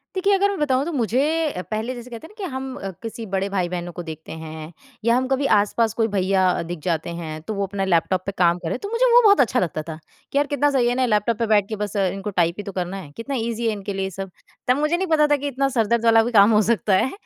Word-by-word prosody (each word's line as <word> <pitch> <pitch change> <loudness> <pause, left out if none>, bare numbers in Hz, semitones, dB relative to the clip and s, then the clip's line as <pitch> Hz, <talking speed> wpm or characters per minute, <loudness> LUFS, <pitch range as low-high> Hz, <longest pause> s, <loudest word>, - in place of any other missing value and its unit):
देखिए, 395 +2 +2
अगर 400 +1 +3
मैं 400 - -3
बताऊँ 270 -3 +2
तो 340 - -3
मुझे 245 -1 +1 0.3
अ, 180 - -5
पहले 220 +4 -2
जैसे 240 0 -9
कहते 240 +6 -9
हैं - - -21
ना 425 -1 -9
कि 375 - -3
हम 265 0 -5 0.3
किसी 225 0 -6
बड़े 195 -1 -1
भाई-बहनों 175 -2 -2
को 175 +1 -7
देखते 160 -1 -9
हैं 160 0 -8 0.3
या 235 - +4
हम 260 0 0
कभी 270 +1 0
आस-पास 220 +2 0
कोई 225 0 +1
भैया 190 -2 +1
दिख 170 0 -6
जाते 165 -2 -1
हैं 155 -2 -6
तो 215 - -5
वो 200 -1 -1
अपना 195 0 -2
लैपटॉप 185 +1 +1
पे 200 - -2
काम 175 -1 +3
कर 175 - -7
रहे - - -1
हैं, - - -4
तो 405 - -4
मुझे 465 +3 +2
वो 485 - +8
बहुत 405 -1 +6
अच्छा 245 - +2
लगता 165 -3 -2
था 160 - -5 0.4
कि - - -1
यार 290 0 +2
कितना 290 +1 +1
सही 255 -3 +2
है 245 - 0
ना, 260 0 +2
लैपटॉप 215 0 +1
पे 230 - +1
बैठ 205 -2 +3
के 220 - -2
बस 210 -1 -4
इनको 195 0 -1
टाइप 170 0 +1
ही 205 - -5
तो 200 - -6
करना 185 0 -3
है, 175 -7 -9
कितना 275 +4 -4
ईज़ी 235 -1 -2
है - - +2
इनके 200 -1 -5
लिए 190 0 -2
सब। 195 0 -7 0.4
तब 250 - +4
मुझे 305 +3 +1
नहीं 380 +1 -2
पता 310 -2 +4
था 295 - +3
कि 285 +1 -4
इतना 275 0 0
सर 225 -2 +3
दर्द 235 +1 +1
वाला 225 0 +6
भी 240 - -2
काम 205 -1 +6
हो 210 - +5
सकता 215 -3 +2
है, 255 - +1
215 Hz, 290 wpm, -22 LUFS, 190-260 Hz, 0.4 s, वो